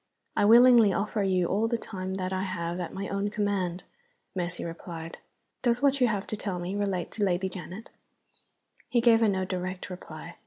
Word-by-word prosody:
"I -, -, +3 dB
willingly 235 Hz, -1 st, +7 dB
offer 210 Hz, +3 st, -1 dB
you 185 Hz, -2 st, +2 dB
all 205 Hz, +6 st, +1 dB
the 235 Hz, 0 st, 0 dB
time 190 Hz, -4 st, -5 dB
that 185 Hz, 0 st, -3 dB
I 185 Hz, -, -1 dB
have 175 Hz, -2 st, -3 dB
at 175 Hz, -, -4 dB
my 195 Hz, +1 st, -4 dB
own 200 Hz, +1 st, -1 dB
command," 200 Hz, -4 st, -1 dB, 0.5 s
Mercy 175 Hz, -1 st, -3 dB
replied. 165 Hz, 0 st, -7 dB, 0.4 s
"Does 240 Hz, +1 st, +1 dB
what 280 Hz, -1 st, +3 dB
you 250 Hz, -, +6 dB
have 210 Hz, -3 st, -1 dB
to -, -, -4 dB
tell 195 Hz, -3 st, -3 dB
me 175 Hz, +3 st, -4 dB
relate 195 Hz, -4 st, -1 dB
to 210 Hz, -, -2 dB
Lady 190 Hz, -1 st, +1 dB
Janet?" 185 Hz, +3 st, -8 dB, 1.0 s
He 245 Hz, -, +3 dB
gave 230 Hz, -1 st, +5 dB
her 225 Hz, -, +4 dB
no 190 Hz, -1 st, 0 dB
direct 185 Hz, 0 st, -4 dB
reply. 180 Hz, -, -9 dB
195 Hz, 190 wpm, -28 LUFS, 180-215 Hz, 1.0 s, willingly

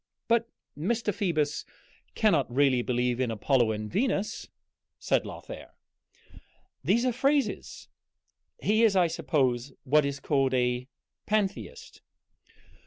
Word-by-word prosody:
"But 230 Hz, 0 st, +2 dB, 0.3 s
Mr. 210 Hz, +7 st, -1 dB
Phoebus 155 Hz, -7 st, -1 dB, 0.5 s
cannot 165 Hz, -, +2 dB
really 130 Hz, -1 st, +3 dB
believe 125 Hz, 0 st, 0 dB
in 130 Hz, -2 st, 0 dB
Apollo 115 Hz, +1 st, +2 dB
and 105 Hz, 0 st, -4 dB
Venus," 210 Hz, -, -1 dB, 0.5 s
said -, -, 0 dB
Lothair. -, -, -9 dB, 1.1 s
"These 235 Hz, +2 st, +2 dB
are 250 Hz, -, +1 dB
phrases. 275 Hz, +3 st, -1 dB, 0.7 s
He 215 Hz, -, +2 dB
is, 215 Hz, -3 st, +4 dB
I 180 Hz, -2 st, +5 dB
suppose, 135 Hz, -5 st, 0 dB
what 150 Hz, +3 st, +4 dB
is 140 Hz, 0 st, -3 dB
called 135 Hz, -3 st, +1 dB
a 125 Hz, 0 st, 0 dB, 0.4 s
Pantheist." 205 Hz, -2 st, -2 dB
150 Hz, 110 wpm, -28 LUFS, -, 1.1 s, I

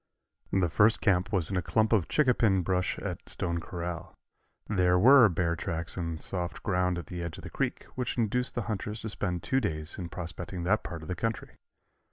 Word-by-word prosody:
The 95 Hz, -2 st, +2 dB
first 105 Hz, +7 st, +4 dB
camp 95 Hz, -3 st, +2 dB
was 95 Hz, -4 st, +3 dB
in 95 Hz, -, 0 dB
a -, -, +1 dB
clump 110 Hz, +6 st, +1 dB
of 95 Hz, -8 st, +3 dB
chincapin 115 Hz, -10 st, +3 dB
brush 90 Hz, 0 st, 0 dB
at -, -, -6 dB
Stone 85 Hz, -1 st, -2 dB
Corral. 85 Hz, -1 st, -6 dB, 0.5 s
There 90 Hz, -3 st, +3 dB
were 120 Hz, +3 st, +8 dB
bear 85 Hz, -1 st, 0 dB
tracks 85 Hz, -2 st, -4 dB
in 85 Hz, -2 st, -3 dB
the 80 Hz, -, -10 dB
soft 90 Hz, -2 st, -4 dB
ground 90 Hz, -2 st, +1 dB
at 85 Hz, -, -5 dB
the 90 Hz, +3 st, -6 dB
edge 85 Hz, -1 st, -5 dB
of -, -, -10 dB
the -, -, -8 dB
creek, -, -, -2 dB
which 125 Hz, -1 st, -3 dB
induced 125 Hz, +2 st, +1 dB
the 120 Hz, -, -1 dB
hunters 105 Hz, 0 st, -4 dB
to 110 Hz, -, -4 dB
spend 90 Hz, -5 st, -3 dB
two 135 Hz, -, +2 dB
days 75 Hz, -5 st, -3 dB
in 85 Hz, -2 st, -5 dB
prospecting 90 Hz, +1 st, -6 dB
that 105 Hz, +5 st, +2 dB
part 85 Hz, -4 st, -7 dB
of -, -, -9 dB
the 90 Hz, -, -2 dB
country. 115 Hz, +5 st, -3 dB
90 Hz, 210 wpm, -29 LUFS, 85-110 Hz, 0.5 s, were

